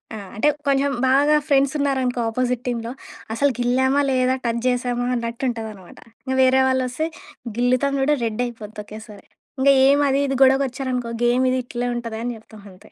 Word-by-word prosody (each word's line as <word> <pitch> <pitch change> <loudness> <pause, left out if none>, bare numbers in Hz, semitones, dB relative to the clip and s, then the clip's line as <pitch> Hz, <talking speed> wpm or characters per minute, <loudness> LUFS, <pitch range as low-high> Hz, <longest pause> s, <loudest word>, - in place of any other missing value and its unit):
ఆ! - - -6 0.2
అంటే 290 +8 +2 0.2
కొంచెం 275 0 +2 0.2
బాగా 285 +3 +4
ఫ్రెండ్సున్నారనుకో 275 -3 +1
అపోజిట్ 250 +1 -1
టీమ్‌లొ, 235 -1 -3 0.4
అసలు 280 +4 +2
గిల్లామా 260 +3 +2
లేదా? 255 0 +2
టజ్ 235 0 -1
జెశామా 245 -1 0
అన్నట్టుంటదనమాట. 230 -5 -5 0.3
ఇగ 260 - 0
వేరే 260 0 +4
వాళ్ళోస్తే 260 +4 -1 0.5
గిల్లుతాము 255 +3 +1
చూడు 295 +2 +3
రెడ్ 225 +1 -2
అయిపోద్ది 220 -3 -8
ఒకేసారి. 215 -1 -12 0.3
ఇంగ 275 - +4 0.2
ఏం 285 +1 +4
అది 270 - +2
ఇది 270 - -1
గొడవకొచ్చారనుకో 260 -2 +1
గేమ్ 245 +2 +3
ఇది 255 - 0
ఇట్లే 245 0 -3
ఉంటది 230 -2 -5
అని 245 - -2
చెప్తాం 220 -1 -15
అంతే. 185 - -18
250 Hz, 155 wpm, -21 LUFS, 235-270 Hz, 0.5 s, బాగా